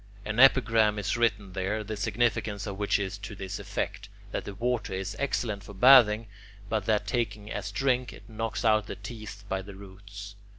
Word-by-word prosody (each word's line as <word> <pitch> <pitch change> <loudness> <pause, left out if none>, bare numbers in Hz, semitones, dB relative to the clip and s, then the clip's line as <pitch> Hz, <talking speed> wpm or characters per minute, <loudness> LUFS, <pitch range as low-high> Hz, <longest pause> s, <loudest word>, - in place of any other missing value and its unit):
An 105 +2 -2
epigram 115 -5 +5
is 105 - -1
written 105 -5 0
there, 100 +3 -2
the 110 +1 -5
significance 105 -1 0
of 100 -2 -6
which 105 - +2
is 100 0 -4
to 100 +1 -7
this 95 -2 -5
effect, - - -4 0.2
that - - -3
the 100 - -7
water 120 -2 -1
is 95 +1 -4
excellent 120 -7 -1
for 100 0 -11
bathing, 115 -1 +7 0.4
but 110 -3 -1
that 105 -2 +2
taken 105 -2 -2
as - - -4
drink, 130 -3 0
it 100 - -14
knocks 115 +1 -4
out 110 -1 +3
the - - -5
teeth 110 -3 -9
by 95 -1 -2
the 100 0 -10
roots. 100 +1 -10
105 Hz, 185 wpm, -28 LUFS, 100-115 Hz, 0.4 s, bathing